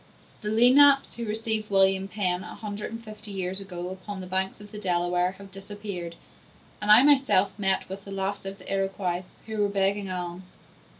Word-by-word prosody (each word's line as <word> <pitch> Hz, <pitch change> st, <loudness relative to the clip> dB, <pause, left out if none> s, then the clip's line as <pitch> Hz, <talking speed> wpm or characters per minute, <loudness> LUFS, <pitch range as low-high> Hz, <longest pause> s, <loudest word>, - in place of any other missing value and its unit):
The 210 Hz, -, -3 dB
Lenapes, 270 Hz, +5 st, +6 dB
who 235 Hz, -, -5 dB
received 220 Hz, 0 st, -1 dB
William 195 Hz, -1 st, +3 dB
Penn, 185 Hz, -3 st, -1 dB
a -, -, -9 dB
hundred 210 Hz, -1 st, -6 dB
and 230 Hz, +1 st, -7 dB
fifty 210 Hz, 0 st, -9 dB
years 190 Hz, -1 st, -2 dB
ago, 180 Hz, -2 st, -6 dB
upon 190 Hz, +2 st, -7 dB
the 185 Hz, -, -6 dB
banks 190 Hz, +2 st, -2 dB
of 205 Hz, -1 st, -13 dB
the 210 Hz, -, -7 dB
Delaware, 180 Hz, -1 st, 0 dB
have 195 Hz, 0 st, -13 dB
disappeared; 195 Hz, -3 st, -7 dB, 0.7 s
and 210 Hz, -, -3 dB
I 215 Hz, +4 st, +9 dB
myself 270 Hz, -9 st, +4 dB
met 190 Hz, -1 st, +1 dB
with 195 Hz, +1 st, -7 dB
the 195 Hz, -, -10 dB
last 195 Hz, 0 st, -3 dB
of 195 Hz, 0 st, -6 dB
the 195 Hz, -, -7 dB
Iroquois, 195 Hz, -2 st, -1 dB, 0.2 s
who 220 Hz, -1 st, -3 dB
were 205 Hz, -, +2 dB
begging 195 Hz, 0 st, 0 dB
alms. 180 Hz, 0 st, -6 dB
195 Hz, 185 wpm, -26 LUFS, 185-210 Hz, 0.7 s, I